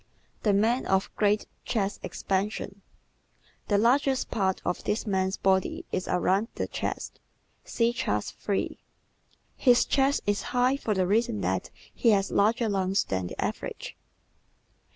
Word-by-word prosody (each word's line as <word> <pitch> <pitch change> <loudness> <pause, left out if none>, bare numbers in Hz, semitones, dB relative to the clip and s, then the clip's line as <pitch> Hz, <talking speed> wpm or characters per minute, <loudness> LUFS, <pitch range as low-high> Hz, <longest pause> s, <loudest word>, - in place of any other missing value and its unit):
The 210 - +2
Man 225 +6 +2
of 190 0 0
Great 210 0 +2 0.2
Chest 205 -3 -1
Expansion 195 0 -3 0.8
¶ - - -38
The 205 - +3
largest 260 +4 +2
part 190 -3 0
of 180 - -2
this 215 - -1
man's 190 -2 0
body 190 -1 +1
is 185 - -2
around 190 +4 +1
the - - -1
chest. - - -4 0.4
(See 235 0 +1
Chart 105 - -1
3) 200 -2 -3 0.8
His 245 -2 +4
chest 275 0 +2
is 205 0 +1 0.2
high 250 +2 +4
for 220 -6 -2
the 185 -1 +2
reason 205 - +1
that 95 0 -1 0.2
he 235 - +2
has 200 -2 +3
larger 225 +3 +2
lungs 195 -1 +1
than 95 -1 -2
the - - -9
average. - - -4
205 Hz, 145 wpm, -27 LUFS, 190-230 Hz, 0.8 s, His